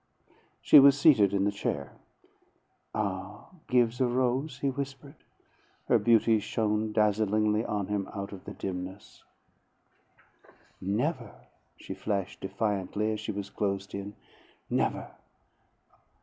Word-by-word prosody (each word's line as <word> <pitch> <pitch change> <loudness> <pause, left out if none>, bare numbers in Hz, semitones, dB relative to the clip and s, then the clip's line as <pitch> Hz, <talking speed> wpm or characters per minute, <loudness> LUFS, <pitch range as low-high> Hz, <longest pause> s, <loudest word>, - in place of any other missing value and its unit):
She 150 - +9
was 140 0 +7
seated 120 - +5
in 100 -1 +1
the 100 - +2
chair. 70 -9 -3 1.0
"Ah, 100 -1 -4 0.2
give 125 -1 +2
the 130 - +3
rose," 130 +3 0
he 140 0 0
whispered. 140 +1 -6 0.7
Her - - +4
beauty 115 -1 +4
shone 105 0 -1
dazzlingly 105 0 +2
on 105 -4 -2
him 100 -1 -3
out 100 -1 -6
of 100 -2 -10
the - - -7
dimness. 95 +1 -7 1.6
"Never!" 115 - -2 0.4
she - - -7
flashed 95 0 -3
defiantly 105 +1 -1
as 110 - -3
she 110 +1 -4
was 100 -1 -6
closed 100 -1 -2
in. 100 +1 -6 0.6
"Never!" - - -1
105 Hz, 120 wpm, -29 LUFS, 100-120 Hz, 1.6 s, She